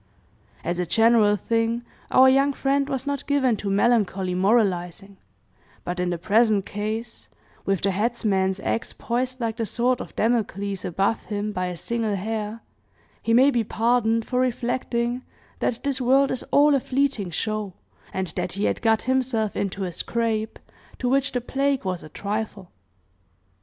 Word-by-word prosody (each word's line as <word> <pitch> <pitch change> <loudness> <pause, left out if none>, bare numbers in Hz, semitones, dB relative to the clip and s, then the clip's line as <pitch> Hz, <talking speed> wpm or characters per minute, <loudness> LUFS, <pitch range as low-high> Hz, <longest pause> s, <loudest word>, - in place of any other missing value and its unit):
As 175 +1 -2
a 180 - 0
general 225 +1 +4
thing, 230 +3 0 0.3
our 260 +1 +6
young 275 +2 +4
friend 275 +1 0
was 270 0 -2
not 285 -1 -3
given 270 -5 +2
to 200 - -4
melancholy 195 -3 +2
moralizing, 195 -1 +1 0.7
but 180 +1 -4
in 180 0 0
the 175 - -1
present 210 +2 +3
case, 220 +3 -5 0.4
with 195 -2 +1
the 200 - +2
headsman's 195 -3 0
axe 230 - -2
poised 255 +2 -2
like 230 -2 -2
the 230 - -1
sword 240 +4 +1
of - - -9
Damocles 200 -4 -1
above 195 +5 0
him 210 0 -3
by 185 -3 -2
a 180 -1 -5
single 225 +1 -1
hair, 215 +2 -4 0.6
he 230 - -1
may 260 +5 +6
be 240 -3 +1
pardoned 230 0 +1
for 250 - -1
reflecting 245 -1 -1 0.4
that 230 - -1
this 275 -2 -1
world 270 +2 +4
is 255 - -2
all 290 +1 +5
a 275 - +4
fleeting 260 -7 0
show, 215 +2 -3 0.4
and 190 0 -2
that - - -2
he 200 +2 -3
had - - 0
got 225 -1 +2
himself 250 -5 0
into 195 0 -2
a 180 - -3
scrape, 220 +2 -2 0.4
to 250 - -2
which 275 +1 +2
the 245 - -1
plague 275 0 0
was 185 -2 -2
a 155 - -11
trifle. 205 0 -4
225 Hz, 165 wpm, -24 LUFS, 200-250 Hz, 0.7 s, our